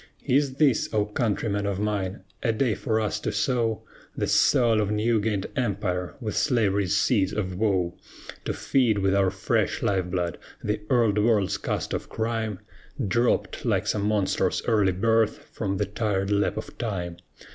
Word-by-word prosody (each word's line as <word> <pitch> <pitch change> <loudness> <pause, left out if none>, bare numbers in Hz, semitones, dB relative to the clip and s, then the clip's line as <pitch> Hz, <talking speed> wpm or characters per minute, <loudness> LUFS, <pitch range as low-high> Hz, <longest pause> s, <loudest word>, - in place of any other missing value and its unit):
Is 135 0 +2
this, 135 -6 +2
O 105 -1 +3
countrymen 105 -1 -1
of 100 -1 -2
mine! 105 -2 -2 0.2
a 115 - +2
day 115 +1 +1
for 110 +2 -1
us 105 -1 -1
to - - -2
sow 115 -5 0 0.3
The - - 0
soil 115 -3 +4
of 105 - -1
new 110 +1 +1
gained 100 -2 -1
empire 100 -7 -1
with 110 -5 -4
slavery's 100 - +2
seeds 105 -4 +2
of 95 -3 -2
woe? 95 -4 +1 0.5
To - - 0
feed 120 -6 +1
with 95 -1 +2
our 100 -1 +3
fresh 95 0 -1
life 95 -3 +1
blood 90 -2 -2 0.2
the 105 0 -1
Old 115 -5 +3
World's 105 -3 +2
cast - - -3
off - - -4
crime, 110 -3 -2 0.5
Dropped, 120 +5 +1
like - - +1
some 105 -1 0
monstrous 105 -3 +1
early 105 -4 +3
birth, 110 +3 +1
from 100 -3 -2
the 105 - 0
tired 100 -1 -1
lap 100 0 +1
of - - -6
Time? 90 -7 -3
105 Hz, 165 wpm, -26 LUFS, 95-115 Hz, 0.5 s, soil